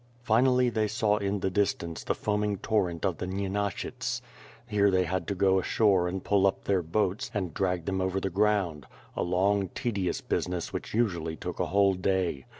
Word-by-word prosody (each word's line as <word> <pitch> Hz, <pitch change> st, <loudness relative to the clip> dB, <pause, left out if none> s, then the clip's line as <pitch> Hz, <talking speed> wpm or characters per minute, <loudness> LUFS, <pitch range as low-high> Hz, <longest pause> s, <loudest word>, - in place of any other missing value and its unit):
Finally 125 Hz, +3 st, +4 dB
they 110 Hz, -2 st, 0 dB
saw 105 Hz, -1 st, +1 dB
in 100 Hz, -1 st, -1 dB
the 95 Hz, -, 0 dB
distance 85 Hz, -4 st, -1 dB
the -, -, -1 dB
foaming 105 Hz, -1 st, -1 dB
torrent 90 Hz, -5 st, 0 dB
of 90 Hz, -4 st, -1 dB
the 90 Hz, -, -3 dB
Nyenashyts. 100 Hz, +1 st, -2 dB, 0.5 s
Here 105 Hz, -3 st, +3 dB
they 95 Hz, -1 st, +3 dB
had 90 Hz, -1 st, -2 dB
to 100 Hz, -, -1 dB
go 95 Hz, 0 st, +3 dB
ashore 95 Hz, -2 st, +2 dB
and 95 Hz, +2 st, -4 dB
pull 100 Hz, -1 st, +3 dB
up 95 Hz, -, -2 dB
their 95 Hz, -2 st, +1 dB
boats, 90 Hz, +4 st, -1 dB
and 95 Hz, -6 st, -2 dB
drag 90 Hz, -3 st, -1 dB
them 95 Hz, -1 st, -1 dB
over 95 Hz, +1 st, 0 dB
the 95 Hz, 0 st, -3 dB
ground; 95 Hz, -7 st, +1 dB, 0.3 s
a -, -, -1 dB
long 95 Hz, +2 st, +1 dB
tedious 100 Hz, -7 st, -1 dB
business 90 Hz, -2 st, -2 dB
which -, -, -5 dB
usually 85 Hz, -9 st, 0 dB
took -, -, -6 dB
a -, -, 0 dB
whole 100 Hz, 0 st, +3 dB
day. 90 Hz, -6 st, -1 dB
95 Hz, 185 wpm, -28 LUFS, 90-105 Hz, 0.5 s, Finally